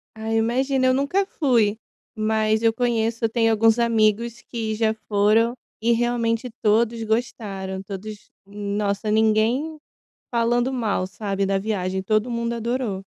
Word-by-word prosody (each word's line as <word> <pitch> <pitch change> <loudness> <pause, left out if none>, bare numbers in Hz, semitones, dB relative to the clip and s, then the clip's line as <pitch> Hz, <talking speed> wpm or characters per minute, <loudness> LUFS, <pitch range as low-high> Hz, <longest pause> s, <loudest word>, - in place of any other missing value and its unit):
Ai, 220 0 -4
eu - - +4
imagino. 260 +3 +1
Eu 255 - +4
nunca 280 +9 +1
fui, 235 - +1 0.4
mas 215 0 +1
eu 225 -1 +3
conheço 230 -1 0
eu 225 - +3
tenho 225 0 +2
alguns 225 +1 +3
amigos 230 0 +1
que 220 -2 -4
já 220 0 +1
foram, 215 +3 +3 0.3
e 235 +1 +3
realmente 235 0 0
todos 225 +2 +2
gostaram. 205 -4 -3
Todos 200 +2 -8 0.2
nossa, 205 +1 -2
ninguém 220 +8 +2 0.5
falando 240 +2 +1
mal, 225 -7 -1
sabe, 195 0 -3
da 195 0 +1
viagem, 190 -2 -2
todo 215 +5 0
mundo 235 0 -2
adorou. 235 -4 -2
225 Hz, 140 wpm, -23 LUFS, 210-235 Hz, 0.5 s, eu